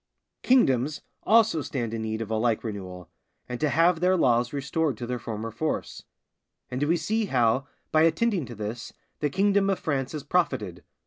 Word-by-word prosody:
Kingdoms 150 Hz, -, +2 dB, 0.2 s
also 220 Hz, -7 st, +4 dB
stand 120 Hz, -5 st, -3 dB
in 115 Hz, -, -3 dB
need 110 Hz, 0 st, -2 dB
of 110 Hz, -, -9 dB
a -, -, +1 dB
like 110 Hz, 0 st, +1 dB
renewal, 95 Hz, -5 st, -6 dB, 0.4 s
and 125 Hz, -1 st, -5 dB
to 150 Hz, -, +1 dB
have 165 Hz, +3 st, +3 dB
their 185 Hz, +2 st, +3 dB
laws 120 Hz, -5 st, +2 dB
restored 140 Hz, -1 st, -1 dB
to 120 Hz, -, -5 dB
their 125 Hz, 0 st, -3 dB
former 115 Hz, 0 st, -5 dB
force; 155 Hz, +7 st, -3 dB, 0.7 s
and 125 Hz, +2 st, -3 dB
we 160 Hz, +4 st, +2 dB
see 215 Hz, +7 st, 0 dB
how, 130 Hz, -, +1 dB, 0.2 s
by 155 Hz, -, +4 dB
attending 165 Hz, -, +2 dB
to 120 Hz, -, -8 dB
this, 110 Hz, +3 st, -6 dB, 0.3 s
the 150 Hz, -, 0 dB
kingdom 195 Hz, +3 st, +2 dB
of 195 Hz, -, +1 dB
France 135 Hz, -4 st, -2 dB
has 150 Hz, -3 st, -5 dB
profited. 130 Hz, -, -1 dB
135 Hz, 180 wpm, -26 LUFS, 115-165 Hz, 0.7 s, also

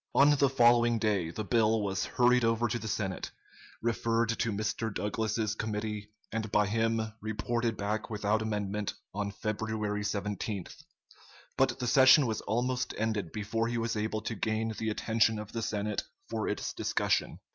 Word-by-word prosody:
On 145 Hz, +1 st, +7 dB
the 140 Hz, -1 st, +4 dB
following 120 Hz, -2 st, +5 dB
day 105 Hz, -6 st, +1 dB
the 110 Hz, +6 st, -4 dB
bill 110 Hz, 0 st, +2 dB
was 95 Hz, -1 st, -1 dB
hurried 125 Hz, 0 st, +3 dB
over 115 Hz, +1 st, +2 dB
to 120 Hz, +1 st, -2 dB
the 110 Hz, -, -6 dB
Senate, 100 Hz, -3 st, -2 dB, 0.5 s
referred 115 Hz, 0 st, +1 dB
to 115 Hz, 0 st, 0 dB
Mr. 110 Hz, +2 st, -2 dB
Douglas's 110 Hz, +1 st, -1 dB
committee, 105 Hz, -1 st, -3 dB, 0.2 s
and 110 Hz, -2 st, -3 dB
by 105 Hz, 0 st, +4 dB
him 115 Hz, +1 st, 0 dB
reported 110 Hz, +1 st, -1 dB
back 105 Hz, +2 st, -2 dB
without 105 Hz, 0 st, 0 dB
amendment, 105 Hz, -1 st, -2 dB, 0.2 s
on 100 Hz, 0 st, -2 dB
February 105 Hz, 0 st, -2 dB
17th; 100 Hz, -1 st, -3 dB, 0.8 s
but -, -, +2 dB
the 125 Hz, -, -3 dB
session 130 Hz, +3 st, +7 dB
was 110 Hz, -3 st, -2 dB
almost 125 Hz, +4 st, -1 dB
ended 105 Hz, -6 st, -1 dB
before 110 Hz, +2 st, -1 dB
he 120 Hz, 0 st, -2 dB
was 115 Hz, 0 st, -1 dB
able 110 Hz, 0 st, -1 dB
to 115 Hz, -, -3 dB
gain 110 Hz, +1 st, -1 dB
the 110 Hz, +1 st, -2 dB
attention 110 Hz, +1 st, +2 dB
of 105 Hz, 0 st, -7 dB
the 115 Hz, -, -3 dB
Senate 105 Hz, -2 st, -1 dB, 0.3 s
for -, -, -1 dB
its -, -, -2 dB
discussion. -, -, 0 dB
110 Hz, 160 wpm, -30 LUFS, 105-115 Hz, 0.8 s, On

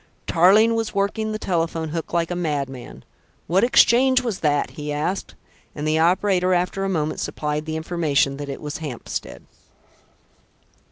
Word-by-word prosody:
Tarling 200 Hz, +7 st, +5 dB
was 225 Hz, -2 st, -2 dB
working 210 Hz, +2 st, -1 dB
the 215 Hz, -, -2 dB
telephone 165 Hz, -4 st, -2 dB
hook 165 Hz, +1 st, -5 dB
like 170 Hz, 0 st, 0 dB
a -, -, -1 dB
madman. 140 Hz, -7 st, -4 dB, 0.4 s
"What 185 Hz, +4 st, +2 dB
exchange 255 Hz, +1 st, +4 dB
was 230 Hz, -6 st, -3 dB
that?" 145 Hz, -2 st, 0 dB
he 150 Hz, -2 st, -6 dB
asked, 155 Hz, +6 st, -3 dB, 0.4 s
and 150 Hz, +1 st, -3 dB
the 155 Hz, +1 st, +2 dB
operator 185 Hz, +2 st, +2 dB
after 180 Hz, +2 st, -1 dB
a 195 Hz, -, -1 dB
moment 155 Hz, -4 st, -1 dB
supplied 150 Hz, +1 st, -3 dB
the 160 Hz, 0 st, -2 dB
information 155 Hz, -5 st, 0 dB
that 145 Hz, 0 st, -6 dB
it 140 Hz, -, -6 dB
was 150 Hz, -1 st, -5 dB
Hampstead. 145 Hz, -7 st, -6 dB
165 Hz, 155 wpm, -22 LUFS, 150-195 Hz, 0.4 s, Tarling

